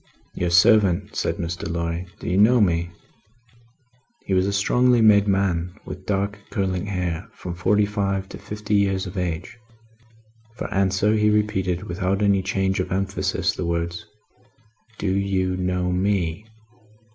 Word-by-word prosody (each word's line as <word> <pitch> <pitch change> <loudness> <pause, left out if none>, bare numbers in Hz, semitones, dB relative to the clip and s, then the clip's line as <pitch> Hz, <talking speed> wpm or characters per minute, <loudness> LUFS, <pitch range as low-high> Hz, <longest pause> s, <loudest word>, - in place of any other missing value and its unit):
"Your 90 - -1
servant," 100 +1 +4
said 85 - -1
Mr. 85 0 -4
Lorry. 85 +1 -3
"Do - - -8
you 90 - 0
know 120 +4 +6
me?" 85 -4 +2 1.4
He 95 - -2
was 95 +1 +2
a - - 0
strongly 125 +5 +3
made 105 -2 +5
man 90 -3 0
with 95 +1 -9
dark 100 +1 -1
curling 95 0 -2
hair, 90 -1 -3
from 90 - -6
forty 100 +4 +2
five 100 -2 -2
to - - -9
fifty 105 0 -5
years 100 -2 +2
of 95 +1 -8
age. 90 +4 -4 1.0
For - - -5
answer 95 +2 +2
he 105 -1 +3
repeated, 100 -4 0
without 95 +1 -1
any 100 -1 +3
change 95 0 -1
of 90 - -2
emphasis, 95 +1 -1
the 90 - -4
words: 85 0 -3 0.9
"Do 95 - -1
you 95 -1 0
know 90 0 -1
me?" 95 0 -1
95 Hz, 145 wpm, -23 LUFS, 90-100 Hz, 1.4 s, know